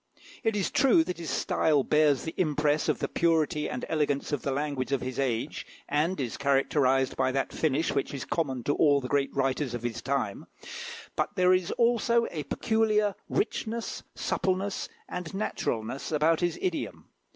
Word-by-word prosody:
It 225 -2 +1
is 200 - 0
true 245 -12 +5
that 180 0 -5
his 165 -3 -5
style 145 +2 +2
bears 150 -3 +3
the 160 - -4
impress 150 -2 +1
of - - +2
the - - -2
purity 160 -2 +1
and 125 - -4
elegance 150 -3 0
of 145 - -1
the - - -2
language 140 -1 -2
of 140 - +1
his 130 +1 -4
age, 120 -4 -1 0.2
and 155 +5 0
is 125 -4 -3
characterised 135 -1 +2
by 130 0 +1
that 135 0 -1
finish 155 +1 +1
which 140 - -1
is 135 -3 -5
common 135 -7 -1
to 145 - +1
all 145 -2 +4
the 125 - -5
great 140 0 +1
writers 135 -1 0
of 120 - -6
his 115 -1 -3
time; 130 -7 -2 0.7
but - - -1
there 185 -1 +5
is 185 0 +1
also 235 0 +3
a 155 - -3
peculiar 215 0 +1 0.2
richness, 225 +1 -2
suppleness, 190 +1 -1 0.2
and 180 0 -5
naturalness 130 - -2
about 155 +1 +3
his 175 -1 0
idiom. 340 -5 -3
150 Hz, 175 wpm, -28 LUFS, 135-180 Hz, 0.7 s, true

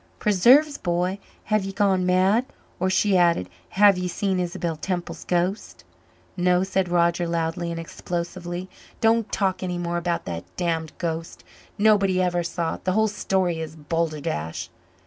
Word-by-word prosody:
"Preserve's, 255 - +4
b'y, 180 +2 -1 0.2
have 215 -2 +1
ye 195 - -4
gone 190 -2 +2
mad? 190 +7 +3 0.3
Or," 185 +1 +1
she 195 +1 +2
added, 170 - +3 0.2
"have 200 -1 +5
ye 180 - -1
seen 190 +1 -1
Isabel 170 -2 -2
Temple's 175 +2 -4
ghost?" 180 +3 -1 0.5
"No," 180 0 +2
said 190 -1 0
Roger 170 0 +2
loudly 170 +1 -1
and 165 0 -4
explosively. 175 +2 -5 0.3
"Don't 225 -1 +2
talk 190 -2 0
any 180 -1 -2
more 175 0 -2
about 170 0 -2
that 85 -1 -4
damned 165 -3 -1
ghost. 165 -1 -4 0.3
Nobody 200 -3 +4
ever 175 -1 +1
saw 170 -1 -2
it. - - -25
The 185 - 0
whole 220 +2 +3
story 190 -4 0
is 160 -1 -6
balderdash." 150 - -3
180 Hz, 150 wpm, -24 LUFS, 170-195 Hz, 0.5 s, have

